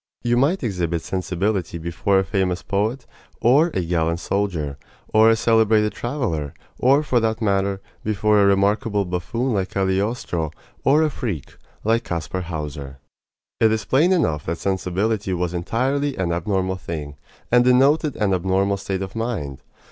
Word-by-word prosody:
You 120 0 +2
might 140 +9 +2
exhibit 85 -7 -1
sensibility 95 -1 -2
before 85 +4 0
a 95 - +3
famous 95 -2 -1
poet, 110 +5 -1 0.3
or 140 +8 +4
a 90 - 0
gallant 85 0 0
soldier, 85 -8 -2 0.3
or 110 +1 +6
a 115 - +5
celebrated 110 -1 +3
traveler 115 - -3 0.2
or, 135 +4 +4
for 130 -5 +2
that 110 0 0
matter, 100 -2 0 0.2
before 105 0 +2
a - - +5
remarkable 100 +2 +2
buffoon, 105 +8 -2
like 95 -2 -1
Cagliostro, 95 -3 -1 0.3
or 150 +4 +4
a 155 - +1
freak, 100 - -5 0.3
like 115 +2 +2
Kaspar 90 0 -3
Hauser. 75 -5 -6 0.6
It 110 -1 +4
is 110 -1 -1
plain 155 - +3
enough 80 - +1
that 85 +1 -1
sensibility 95 +2 -1
was 90 0 -2
entirely 130 +11 -1
an 90 -3 -1
abnormal 95 +2 -1
thing, 75 -5 -6 0.4
and 120 0 +6
denoted 135 +4 +3
an 100 -3 +1
abnormal 95 +2 +1
state 95 -1 -3
of 95 +2 -8
mind. 105 - -3
100 Hz, 150 wpm, -22 LUFS, 90-115 Hz, 0.6 s, or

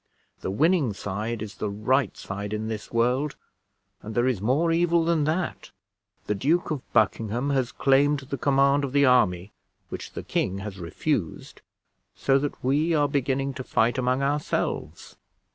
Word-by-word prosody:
The - - -4
winning 150 - +2
side 105 +3 -4
is 105 -2 -7
the 105 - -2
right 110 +4 0
side 100 +2 -5
in 110 +1 -3
this 110 -2 -6
world; 125 +5 +1 0.7
and 110 +1 -8
there 120 +1 +2
is 120 -7 0
more 140 +10 +2
evil 170 0 +2
than 165 -3 +2
that; 160 +3 -2 0.6
the - - 0
Duke 155 - +1
of 150 -4 -2
Buckingham 115 +5 +1
has 130 -2 0
claimed 140 +1 +3
the 135 +1 -5
command 140 +1 +3
of 135 -2 -3
the 140 0 +5
army, 100 -7 +3 0.4
which - - -7
the - - -6
king 95 +1 -1
has 100 -1 -7
refused, 90 - -3 0.5
so 135 0 +2
that 145 +1 -4
we 150 +6 +2
are 145 -1 +3
beginning 135 0 -1
to 130 - -6
fight 120 +1 +1
among 130 +2 +1
ourselves. 145 +2 -2
130 Hz, 160 wpm, -25 LUFS, 110-145 Hz, 0.7 s, the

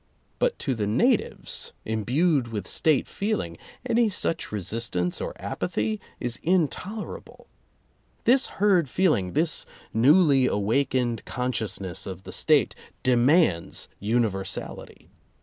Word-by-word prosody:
But - - +1
to 135 - -1
the 105 -4 -2
natives 105 - 0
imbued 125 - +1
with 105 -4 -5
State 155 -4 +1
feeling, 200 - -2 0.3
any 235 -2 +3
such 185 -4 -2
resistance 95 -3 -2
or - - -5
apathy 110 0 -2 0.2
is 120 -1 -3
intolerable. 185 +5 -2 0.8
This 260 +3 +4
herd 190 -7 +3
feeling, 135 - +1
this 160 +1 0 0.3
newly 140 +2 +5
awakened 120 +2 0
consciousness 100 -7 -3
of 95 -1 -7
the - - -9
State, - - +3 0.3
de 125 -1 +4
mands 125 - +2
universality. 105 -3 -3
125 Hz, 110 wpm, -26 LUFS, 105-170 Hz, 0.8 s, newly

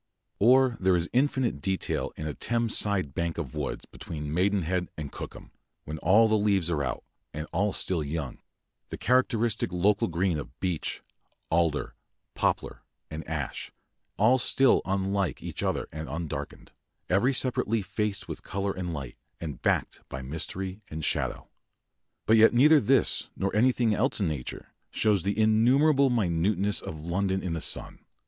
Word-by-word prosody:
Or 125 +2 +5
there 95 -1 +3
is 85 0 0
infinite 130 - +1
detail 95 +3 -1
in 80 - -6
a 75 - -3
Thames 115 +4 0
side 95 -9 +2
bank 85 -1 -2
of 75 -8 -5
woods - - -4
between 75 -2 -7
Maidenhead 90 -1 0
and 75 -2 -5
Cookham, - - -9 0.3
when 75 +1 -6
all 105 +8 +5
the 110 -1 +2
leaves 100 -5 +1
are 75 -3 0
out, 65 - -3 0.3
and 75 0 -4
all 100 +5 +1
still 90 -4 -1
young 75 -1 -4 0.5
the - - -6
characteristic 120 -5 +1
local 100 +4 +2
green 85 -1 0
of 70 -1 -10
beech, 90 -4 -3 0.5
alder, 80 -3 +1 0.4
poplar, - - -1 0.3
and 80 +1 -5
ash, 75 -5 -4 0.5
all 120 +5 +4
still 135 +2 +3
unlike 95 -3 -1
each - - -5
other - - -1
and 80 -2 -6
undarkened; 80 +2 -6 0.4
every 100 +9 +3
separate 130 -1 0
leaf 110 -2 0
faced 100 +2 -2
with - - -6
colour 100 +1 -2
and 90 -3 -4
light, 70 -4 -7 0.2
and 75 -7 -6
backed - - 0
by 65 - -6
mystery 90 +8 -5
and 80 0 -4
shadow. - - -1 0.8
But 110 - +5
yet 110 +2 +6
neither 150 +4 +6
this - - +2
nor 100 +1 -1
anything 120 0 +3
else 120 +5 0
in 100 - +1
nature 70 -6 -5 0.2
shows 105 -4 +2
the 100 +4 -2
innumerable 130 +6 +4
minuteness 100 -2 +1
of 80 0 -7
London 95 +2 -1
in 90 - -2
the 80 - -3
sun. - - -2
95 Hz, 160 wpm, -27 LUFS, 80-110 Hz, 0.8 s, yet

